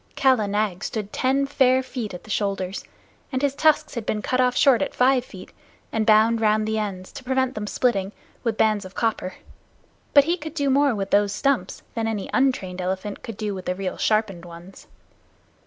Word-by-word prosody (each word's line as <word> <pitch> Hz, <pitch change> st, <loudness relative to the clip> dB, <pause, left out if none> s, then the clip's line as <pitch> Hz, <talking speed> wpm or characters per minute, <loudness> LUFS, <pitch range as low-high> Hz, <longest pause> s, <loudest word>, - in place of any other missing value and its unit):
Kala 255 Hz, -6 st, +3 dB
Nag 200 Hz, -2 st, -1 dB
stood 210 Hz, -2 st, -4 dB
ten 270 Hz, +2 st, +1 dB
fair 260 Hz, -2 st, +3 dB
feet 235 Hz, -7 st, -5 dB
at 180 Hz, -, -10 dB
the 215 Hz, -, -10 dB
shoulders, 195 Hz, -2 st, -2 dB, 0.5 s
and 260 Hz, 0 st, -2 dB
his 280 Hz, -1 st, +2 dB
tusks 305 Hz, +1 st, +2 dB
had 235 Hz, -, -4 dB
been 210 Hz, -1 st, -2 dB
cut 255 Hz, 0 st, +1 dB
off 250 Hz, 0 st, +2 dB
short 265 Hz, -4 st, +5 dB
at 285 Hz, -, -2 dB
five 255 Hz, 0 st, +3 dB
feet, 185 Hz, -6 st, -12 dB, 0.4 s
and 220 Hz, 0 st, -1 dB
bound 220 Hz, +1 st, +5 dB
round 215 Hz, 0 st, +2 dB
the 220 Hz, 0 st, 0 dB
ends, 190 Hz, -3 st, -5 dB
to -, -, -10 dB
prevent 260 Hz, 0 st, 0 dB
them 210 Hz, -4 st, -5 dB
splitting, 200 Hz, -5 st, 0 dB, 0.3 s
with 230 Hz, -3 st, -1 dB
bands 215 Hz, -2 st, +2 dB
of 185 Hz, 0 st, -11 dB
copper; 220 Hz, -5 st, -1 dB, 0.8 s
but 285 Hz, -, +9 dB
he 340 Hz, +5 st, 0 dB
could 315 Hz, -1 st, -8 dB
do 285 Hz, -3 st, +1 dB
more 280 Hz, -2 st, +3 dB
with 195 Hz, -1 st, -4 dB
those 205 Hz, 0 st, +3 dB
stumps 275 Hz, +5 st, -1 dB
than 225 Hz, -1 st, -2 dB
any 215 Hz, -3 st, -3 dB
untrained 190 Hz, -9 st, 0 dB
elephant 190 Hz, +3 st, -3 dB
could 225 Hz, -3 st, -8 dB
do 210 Hz, -2 st, -3 dB
with 185 Hz, -1 st, -7 dB
the 180 Hz, -, -1 dB
real 190 Hz, -1 st, -4 dB
sharpened 215 Hz, -5 st, 0 dB
ones. 175 Hz, +2 st, -12 dB
220 Hz, 200 wpm, -23 LUFS, 200-260 Hz, 0.8 s, but